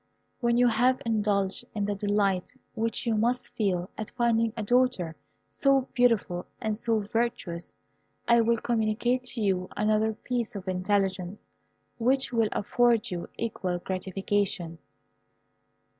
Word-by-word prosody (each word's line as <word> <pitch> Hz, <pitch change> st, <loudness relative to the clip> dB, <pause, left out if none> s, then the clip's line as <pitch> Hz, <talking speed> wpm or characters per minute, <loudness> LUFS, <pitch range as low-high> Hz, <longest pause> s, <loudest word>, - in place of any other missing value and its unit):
When 235 Hz, -1 st, +2 dB
you 245 Hz, 0 st, +5 dB
have 250 Hz, +2 st, +3 dB
indulged 205 Hz, -3 st, 0 dB
in 205 Hz, -1 st, 0 dB
the 205 Hz, -, -1 dB
delight 200 Hz, +1 st, 0 dB, 0.2 s
which 230 Hz, +3 st, -1 dB
you 230 Hz, -, +1 dB
must 235 Hz, +3 st, 0 dB
feel 185 Hz, -5 st, 0 dB
at 215 Hz, -, -3 dB
finding 230 Hz, -2 st, +1 dB
a 220 Hz, -, -2 dB
daughter 240 Hz, -8 st, +2 dB, 0.3 s
so 275 Hz, -1 st, +3 dB
beautiful 230 Hz, -8 st, +2 dB
and 215 Hz, -1 st, -1 dB
so 225 Hz, 0 st, 0 dB
virtuous 205 Hz, -6 st, -2 dB, 0.5 s
I 235 Hz, -1 st, +6 dB
will 230 Hz, +1 st, +2 dB
communicate 235 Hz, +2 st, 0 dB
to 240 Hz, -2 st, -4 dB
you 185 Hz, -3 st, 0 dB
another 215 Hz, +1 st, +2 dB
piece 235 Hz, 0 st, -3 dB
of 195 Hz, -1 st, -7 dB
intelligence, 190 Hz, 0 st, 0 dB, 0.6 s
which 260 Hz, +2 st, +2 dB
will 225 Hz, -2 st, +2 dB
afford 240 Hz, +1 st, +2 dB
you 175 Hz, -1 st, -4 dB
equal 190 Hz, -6 st, -2 dB
gratification." 190 Hz, -2 st, -2 dB
215 Hz, 130 wpm, -28 LUFS, 195-235 Hz, 0.6 s, I